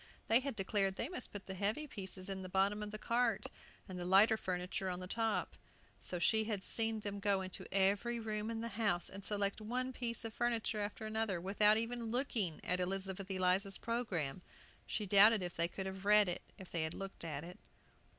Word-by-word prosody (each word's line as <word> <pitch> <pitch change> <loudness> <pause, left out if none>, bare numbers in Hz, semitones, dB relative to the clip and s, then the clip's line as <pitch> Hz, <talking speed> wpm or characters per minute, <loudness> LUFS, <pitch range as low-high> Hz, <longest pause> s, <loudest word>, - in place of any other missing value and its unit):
They 225 +2 +7
had 270 -2 -3
declared 195 -1 +1
they 235 - -2
must 360 -8 -4
put 205 -2 -7
the 190 - -5
heavy 205 +10 -1
pieces 190 -7 -4
in 195 -1 -3
the 185 - -7
bottom 195 +3 +2
of 210 - -4
the 215 - -5
cart, 240 +3 +1 0.4
and 185 -2 -6
the - - -3
lighter 195 +5 +6
furniture 185 -1 -3
on 180 0 -4
top. 225 +1 -1 0.4
So 180 - -3
she 220 +5 +3
had 210 -3 -2
seen 225 -1 +1
them 205 -1 -4
go 200 -1 +2
into 185 0 -4
every 200 +5 +2
room 215 -1 -3
in 225 -1 -3
the 230 - -3
house, 200 -6 +1
and 195 +1 -8
select 200 +1 0
one 255 +4 -2
piece 235 -2 -2
of 225 - -5
furniture 230 -2 0
after 205 +1 -4
another, 215 -4 -1
without 210 +4 +4
even 230 +1 -1
looking 225 - 0
at 180 +1 0
Elizabeth 190 +1 -2
Eliza's 190 +1 +1
programme; 190 - -2 0.5
she 210 - -2
doubted 205 +1 +7
if 175 -1 -4
they 170 +1 +1
could 190 +2 -5
have 190 0 -6
read 210 0 +6
it 175 - -2 0.2
if 190 -3 -11
they 170 - -1
had 160 +1 -2
looked 195 -2 -7
at 150 -3 -4
it. 180 +4 -10
200 Hz, 205 wpm, -36 LUFS, 190-225 Hz, 0.5 s, They